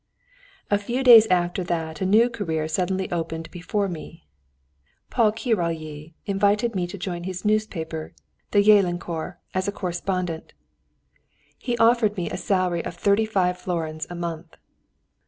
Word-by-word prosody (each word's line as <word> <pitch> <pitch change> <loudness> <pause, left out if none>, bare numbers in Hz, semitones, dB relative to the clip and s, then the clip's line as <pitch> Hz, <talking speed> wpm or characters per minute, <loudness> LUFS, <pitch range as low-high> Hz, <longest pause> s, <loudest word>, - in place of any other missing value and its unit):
A 205 - +4
few 240 +6 -2
days 230 -4 +9
after 180 -1 +1
that, 160 -2 -3
a 190 - +1
new 220 +5 +5
career 165 -10 -2
suddenly 185 +3 -1
opened 165 -1 -3
before 195 +3 -2
me. 165 -1 -8 0.9
Paul 225 -4 +3
Királyi 165 - -3
invited 205 +3 +1
me 180 -3 -1
to 180 - -8
join 175 -2 -4
his 185 +1 -5
newspaper, 175 -7 -2 0.3
the 205 -1 +4
Jelenkor, 175 -4 +2 0.2
as 185 +1 -1
a - - +1
correspondent. 180 -3 -3 1.0
He 240 -2 -3
offered 225 -3 +3
me 175 - -2
a - - -3
salary 185 -3 0
of - - -6
thirty 200 +4 +2
five 180 -4 +1
florins 160 -4 -3
a 175 - -6
month. 170 -1 -6
180 Hz, 140 wpm, -24 LUFS, 170-205 Hz, 1.0 s, days